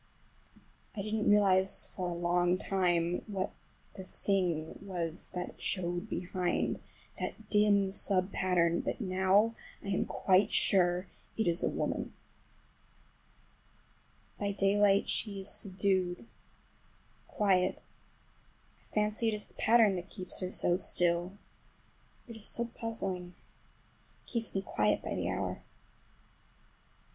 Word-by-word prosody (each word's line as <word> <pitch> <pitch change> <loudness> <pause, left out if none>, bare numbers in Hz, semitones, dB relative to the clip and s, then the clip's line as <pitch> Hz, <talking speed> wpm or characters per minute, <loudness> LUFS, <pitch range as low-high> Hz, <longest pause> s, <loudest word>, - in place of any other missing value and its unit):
I 200 - -3
didn't 215 0 0
realize 195 -2 +4
for 185 -2 -5
a - - -3
long 175 +1 +2
time 175 -3 +1
what 195 -2 -2 0.4
the 190 - -8
thing 180 -5 -1
was 175 -4 -4
that 180 0 -5
showed 175 -2 -2
behind,—that 180 +4 -4
dim 205 -2 +4
sub 190 -1 0
pattern,—but 170 0 +1
now 190 +2 +3 0.3
I 200 - -5
am 190 - +1
quite 190 +2 +3
sure 180 -2 +3 0.3
it 220 - +1
is 170 0 +1
a - - +2
woman. - - -3 2.2
By 200 -1 -1
daylight 200 0 +3
she 205 -3 -1
is 190 - -2
subdued, 185 - -1 1.0
quiet. 190 -3 +1 1.0
I - - -28
fancy 210 +2 +1
it 220 - +1
is 210 - -4
the - - -22
pattern 225 -3 +4
that 180 +2 -7
keeps 185 -3 -4
her 185 - -3
so 175 -1 +2
still. 175 +1 +1 0.9
It 230 - -9
is 220 -1 -6
so 235 - -2
puzzling. 195 -7 -4 0.9
It - - -13
keeps 230 -4 0
me 195 - 0
quiet 105 - +1
by - - -3
the - - -2
hour. - - -3
190 Hz, 120 wpm, -32 LUFS, 180-205 Hz, 2.2 s, realize